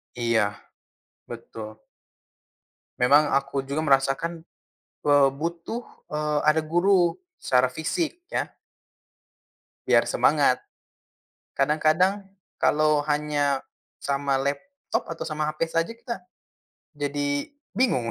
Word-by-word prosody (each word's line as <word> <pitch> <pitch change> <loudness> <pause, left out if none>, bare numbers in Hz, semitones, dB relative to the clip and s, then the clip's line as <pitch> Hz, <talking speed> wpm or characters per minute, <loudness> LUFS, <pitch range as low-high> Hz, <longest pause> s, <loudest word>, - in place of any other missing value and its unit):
Iya, 110 -4 +1 0.7
betul. 110 -2 -9 1.1
Memang 145 +4 +5
aku 135 0 0
juga 140 +3 -3
merasakan, 140 +4 +1 0.6
eee, 145 -1 +5
butuh 170 - -4 0.3
eee, 150 0 -1
ada 160 +1 +5
guru 175 +2 +3 0.2
secara 125 - +2
fisik, 330 - -3
ya. - - -2 1.4
Biar - - +5
semangat, - - +3 0.9
kadang-kadang 155 +8 +2 0.4
kalau 150 -1 +3
hanya 145 -2 +1 0.4
sama 140 -1 0
laptop, 260 - -3
atau 165 - -5
sama 155 -1 -3
HP 155 - -26
saja 165 +4 0
kita 235 0 -6 0.8
jadi 145 0 -2 0.3
bingung. 185 - +1
150 Hz, 95 wpm, -25 LUFS, 135-165 Hz, 1.4 s, Memang